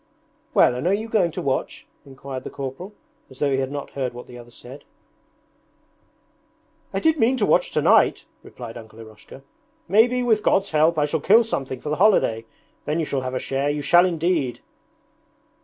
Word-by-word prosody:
'Well, - - +5
and 125 +7 -3
are 195 - +3
you 220 +2 -5
going 210 -6 +1
to - - -6
watch?' 135 -1 -3 0.2
inquired 135 -1 -8
the - - -7
corporal, 140 +9 -7 0.4
as 130 - -15
though 140 0 0
he 135 - +1
had 135 0 -3
not 145 -1 -6
heard 130 -3 -4
what 125 - -9
the 125 - -13
other 120 -1 -12
said. 130 +4 -13 2.1
'I 195 - -3
did 320 -1 +2
mean 250 +3 +2
to 210 - +1
watch 175 - +2
tonight,' 150 - +3 0.2
replied 120 -2 -10
Uncle 110 -1 -13
Eroshka. 110 +4 -14 0.4
'Maybe, 240 +6 +3
with 220 -3 +2
God's 195 -1 +1
help, 155 +1 +2
I 150 - +2
shall 155 +2 -2
kill 215 +10 +5
something 135 - -4
for 150 - -6
the 150 - -1
holiday. 115 - +3 0.4
Then 150 +2 -1
you 165 - -1
shall 140 -2 -2
have 130 0 -4
a - - 0
share, 135 +2 -2
you 145 0 -2
shall 175 +5 +5
indeed!' 165 -6 -1
145 Hz, 190 wpm, -22 LUFS, 130-190 Hz, 2.1 s, Well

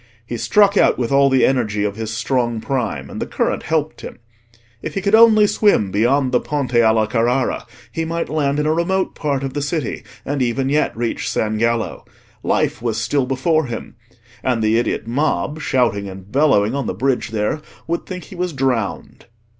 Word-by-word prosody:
He 120 - -5
struck 200 - +3
out - - +4
with 120 -1 -2
all 140 0 +5
the 130 -1 +4
energy 110 -6 0
of 100 -1 -2
his 110 0 -4
strong 120 0 -1
prime, 110 - -2
and - - -7
the - - -2
current - - -1
helped 155 -1 -2
him. - - -8 0.6
If - - -6
he 195 - -1
could 200 - 0
only 220 -1 +7
swim 205 - +2
beyond 125 +6 +2
the 125 - +3
Ponte 140 -3 -3
alla 110 -2 +4
Carrara 120 +4 0 0.2
he 165 - -2
might 165 +1 -2
land 145 -2 0
in 150 - 0
a 155 - +2
remote 185 +3 0
part 140 -3 -2
of 135 -1 -4
the 145 - -2
city, 145 -3 -2 0.2
and 140 0 -2
even 130 +2 0
yet 150 -5 +1
reach 115 -1 -2
San 110 0 -1
Gallo. 115 0 -1 0.4
Life - - 0
was 115 -2 -1
still 140 -3 0
before 155 +3 +1
him. 115 -2 -7 0.5
And 120 -3 0
the 110 +2 +3
idiot 120 - -2
mob, 145 +4 -1
shouting 115 -9 0
and 95 +1 -11
bellowing 130 -6 +3
on 140 -3 -2
the - - -3
bridge 130 -3 0
there, 110 +7 -1 0.2
would 170 +1 -3
think 180 -1 -6
he 195 - -12
was 180 -1 -2
drowned. 125 -7 -2
130 Hz, 195 wpm, -19 LUFS, 115-150 Hz, 0.6 s, only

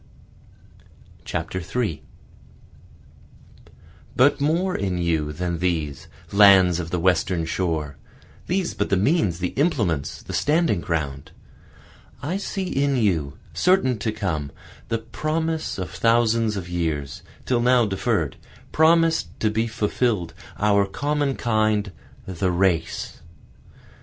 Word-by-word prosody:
3 95 -1 -3 2.1
But 140 +3 +4
more 170 +6 +1
in 95 -2 -1
you 80 -4 0
than 85 +2 -3
these, 80 -6 -2 0.2
lands 95 -4 +6
of 85 -2 -4
the 90 - -1
Western 90 -1 +1
shore, 80 -4 -2 0.5
(These 185 0 -1
but - - -2
the 95 - +2
means, 105 - +2
the 90 0 -2
implements, 105 - -1
the - - -8
standing 155 - +2
ground,) 75 -6 -3 0.9
I 155 +9 -2
see 195 -1 -3
in 140 -5 0
you, 85 - 0 0.2
certain 170 - +2
to 110 +2 -1
come, 85 -10 -3 0.4
the 115 - 0
promise 155 +8 -3
of 90 -4 -5
thousands 115 -2 +2
of 90 -2 -5
years, 80 -6 -3 0.2
till 120 -2 +1
now 125 -1 +4
deferr'd, 95 -2 -1 0.3
Promis'd 165 - +3
to 110 - +1
be 110 +2 0
fulfill'd, 110 -4 -1 0.2
our 100 -1 +3
common 145 +2 -1
kind, 110 -3 +1 0.3
the 95 0 -1
race. 90 -2 -1
100 Hz, 115 wpm, -23 LUFS, 85-130 Hz, 2.1 s, lands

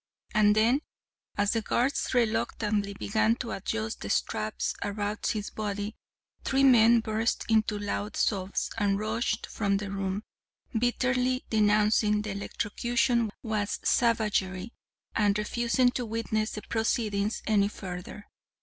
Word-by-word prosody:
And 210 -1 +5
then, 235 +6 +3 0.6
as 205 0 +2
the 225 - 0
guards 255 +5 0
reluctantly 215 -3 0
began 220 +2 +1
to 235 -2 -5
adjust 110 - -3
the 100 - -5
straps 110 +1 -1
about 205 +1 -2
his 210 -2 -2
body, 210 0 -4 0.5
three 270 +1 +2
men 235 -3 +6
burst 220 +1 -1
into 220 -2 +2
loud 205 0 -3
sobs 195 -2 0
and 200 -1 +2
rushed 220 +1 -1
from 200 -2 0
the 200 -1 -5
room, 195 +1 -2 0.5
bitterly 255 +2 +1
denouncing 210 0 +3
the 215 - -4
electrocution 235 +3 0 0.2
as 210 -2 -1
savagery, 215 -4 +1 0.4
and 205 -1 +3
refusing 240 +4 +1
to 245 -1 -3
witness 220 -1 -1
the 215 - -6
proceedings 215 -2 -1
any 205 -2 +3
further. 190 0 -7
215 Hz, 125 wpm, -28 LUFS, 205-230 Hz, 0.6 s, men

